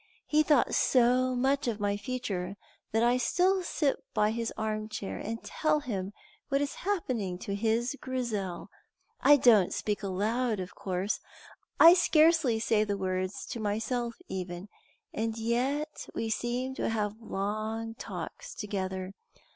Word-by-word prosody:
He 305 0 +3
thought 295 -4 +3
so 255 +1 +3
much 270 +2 +1
of 225 -3 -1
my 205 0 0
future 205 -5 -3 0.4
that 225 +1 +2
I 240 +1 +4
still 370 +9 +2
sit 300 -5 0 0.2
by 210 0 +3
his 230 0 -2
arm 215 0 -2
chair 215 -2 -5
and 225 +2 -5
tell 305 -1 0
him 200 -8 -3 0.4
what 275 0 +2
is 285 0 -1
happening 255 - -1
to 200 - -5
his 230 +5 0
Grizel. 220 -9 -3 0.5
I 290 - +7
don't 220 -8 +5
speak 210 -1 -2
aloud, 215 +4 0
of 185 0 -6
course; 190 +2 -2 0.6
I 335 +1 +10
scarcely 320 -8 +4
say 220 -1 +2
the 205 -1 -2
words 185 0 -2
to 235 - -4
myself 230 +3 -1
even; 180 +1 -5 0.4
and 225 +1 -2
yet 260 +7 -1
we 225 -1 -2
seem 245 +3 -1
to - - 0
have 215 0 -2
long 215 +2 -3
talks - - -7
together. 190 -2 -4
225 Hz, 145 wpm, -30 LUFS, 205-255 Hz, 0.6 s, I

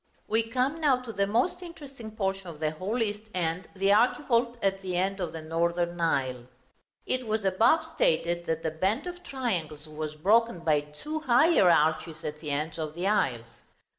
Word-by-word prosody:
We 225 +1 +2
come 255 +7 -1
now 275 -5 +4
to 230 -3 -7
the 200 0 +1
most 240 - +1
interesting 275 -10 -10
portion 195 -2 -2
of 160 -3 -9
the 155 -1 0
whole 200 +9 -1
east 210 0 -4
end, 170 0 -1
the 195 +1 +2
archivolt 240 +1 +2
at 195 -2 0
the 185 -2 -3
end 195 +2 0
of 175 -4 -2
the 160 -1 -7
northern 170 +2 -1
aisle. 130 -6 0 0.6
It 255 -2 -2
was 215 -1 -1
above 220 - +4
stated, 175 - 0
that 160 0 -1
the 160 - -1
band 190 - 0
of 355 0 -7
triangles 175 - -3
was 155 0 -6
broken 210 +4 +2
by 155 -3 +3
two 150 - -6
higher 275 - +5
arches 160 0 +2
at 150 0 -5
the 150 - -6
ends 155 +3 -2
of 155 -1 -4
the 175 +2 -3
aisles. 125 - 0
190 Hz, 185 wpm, -28 LUFS, 160-235 Hz, 0.6 s, higher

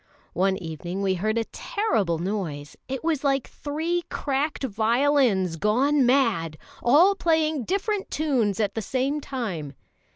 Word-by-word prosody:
One 190 +2 +1
evening 175 +2 -5
we 190 -1 +2
heard 215 +5 -1
a 230 - +2
terrible 215 - -1
noise; 165 -5 -4
it 265 +1 -4
was 315 -4 0
like 275 -2 +1
three 320 +4 -2
cracked 280 +1 -2
violins 230 - +2
gone 255 - +2
mad, 225 - +2 0.2
all 320 +11 +5
playing 315 - +1
different 400 +2 -1
tunes 250 -10 0
at 210 -2 0
the 225 - -3
same 265 +7 -1
time. 190 - -4
245 Hz, 135 wpm, -25 LUFS, 195-295 Hz, 0.2 s, all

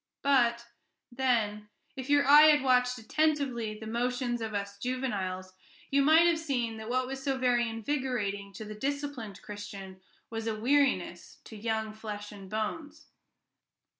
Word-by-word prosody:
But, 240 -4 +3 0.5
then, 225 -5 0 0.3
if 265 +1 -6
your 290 0 +4
eye 295 +2 +9
had 295 -2 +5
watched 250 -1 +3
attentively 250 -3 0
the 220 - -9
motions 240 +1 -1
of 220 -2 -4
us 200 0 -4
juveniles, 200 -7 -3 0.4
you 280 0 +4
might 315 +4 +6
have 340 -1 +3
seen 245 -8 -2
that 220 +1 -7
what 255 +1 +1
was 265 +1 -6
so 270 -1 -1
very 245 -2 +2
invigorating 225 -5 -2
to 215 - -8
the 215 - -7
disciplined 275 -4 -4
Christian 200 -2 -8 0.3
was 225 0 -4
a 215 -1 -2
weariness 250 -9 +1
to 220 - -11
young 220 0 -2
flesh 210 -1 -7
and 195 -2 -11
bones. 290 +9 -4
235 Hz, 150 wpm, -30 LUFS, 210-270 Hz, 0.5 s, eye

